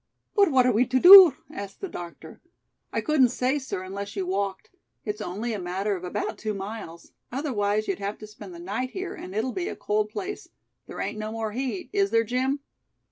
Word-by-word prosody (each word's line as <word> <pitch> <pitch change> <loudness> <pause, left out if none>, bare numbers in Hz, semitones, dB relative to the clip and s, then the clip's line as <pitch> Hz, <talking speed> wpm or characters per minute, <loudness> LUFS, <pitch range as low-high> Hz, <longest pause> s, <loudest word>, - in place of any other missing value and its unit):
"But 405 -4 +5
what 260 -4 +4
are 250 - +4
we 235 +3 +2
to 260 +1 +2
do?" 365 -3 +11 0.2
asked 200 -1 -8
the 390 - -4
doctor. 170 - -10 0.5
"I - - -1
couldn't 285 -5 +3
say, 255 +4 0
sir, 255 -8 -5
unless 200 +2 -6
you 195 -2 -2
walked. 195 +1 -3 0.3
It's 210 0 -4
only 210 +5 -3
a 210 - -3
matter 190 +3 -2
of 180 - -8
about 185 +3 -4
two 215 -1 -3
miles. 195 -4 -8 0.2
Otherwise, 215 -6 -1
you'd 195 - -2
have 200 +1 -4
to 215 - -10
spend 210 -4 -11
the - - -10
night 205 +9 -3
here 375 +5 -5
and 185 - -9
it'll 230 +4 -1
be 365 -1 -3
a - - -4
cold 210 0 -1
place. 390 - -6 0.4
There - - -8
ain't 215 - -4
no 215 0 -4
more 225 -1 -3
heat, 265 - -4
is 400 -1 +2
there, 230 0 +3
Jim?" 260 +5 -1
215 Hz, 210 wpm, -26 LUFS, 200-260 Hz, 0.5 s, do